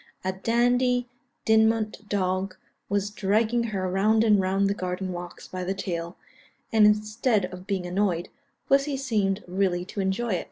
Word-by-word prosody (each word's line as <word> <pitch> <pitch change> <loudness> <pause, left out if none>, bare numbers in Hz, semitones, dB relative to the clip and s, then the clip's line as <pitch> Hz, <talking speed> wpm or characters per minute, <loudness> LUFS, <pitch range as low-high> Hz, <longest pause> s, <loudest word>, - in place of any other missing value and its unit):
A 190 - 0
Dandie 245 +4 +2 0.4
Dinmont 220 -1 +2
dog 185 -1 -1 0.3
was 205 0 0
dragging 215 +4 +1
her 195 -4 -2
round 210 +4 +3
and 210 -3 +4
round 195 +1 +1
the 200 - +1
garden 185 -1 -3
walks 175 0 -8
by 185 0 -5
the 190 +2 -2
tail, 170 -3 -4 0.6
and 215 -1 +7
instead 215 0 +1
of 185 +1 -10
being 190 -3 -1
annoyed, 180 -1 0 0.4
pussy 275 0 +2
seemed 215 -7 0
really 180 -1 0
to 200 - -7
enjoy 195 +5 -1
it." 180 - 0
200 Hz, 155 wpm, -26 LUFS, 185-220 Hz, 0.6 s, and